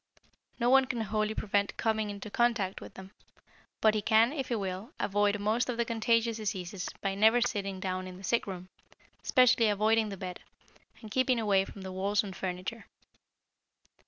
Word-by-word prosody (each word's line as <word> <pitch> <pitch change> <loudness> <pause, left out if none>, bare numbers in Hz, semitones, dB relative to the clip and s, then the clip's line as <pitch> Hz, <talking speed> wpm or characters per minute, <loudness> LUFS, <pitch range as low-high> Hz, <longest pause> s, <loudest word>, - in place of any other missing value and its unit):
No 240 +1 +2
one 270 0 +6
can 245 -2 -3
wholly 215 0 -1
prevent 205 -1 -1
coming 220 -2 0
into 205 +1 -7
contact 230 -6 0
with - - -11
them, 190 0 -11 0.7
but 220 -1 +5
he 215 - 0
can, 225 +5 +4
if 270 -4 -3
he 240 - -1
will, 195 - -4
avoid 205 0 +1
most 220 +5 0
of 240 - -2
the 235 - +1
contagious 230 0 +1
diseases 195 -3 -4
by 195 -1 -1
never 220 +4 +4
sitting 200 -5 -2
down 185 0 -3
in 180 0 -9
the 190 - -13
sick 230 +4 0
room, 185 -2 -6 0.6
especially 250 -4 +4
avoiding 215 +1 +2
the 195 - -6
bed, 180 -1 -6 0.6
and 215 - -10
keeping 255 0 +2
away 200 -3 +2
from 195 - -11
the 190 - -6
walls 200 +3 0
and 195 -3 -7
furniture. 185 +4 -5
210 Hz, 180 wpm, -30 LUFS, 195-230 Hz, 0.7 s, one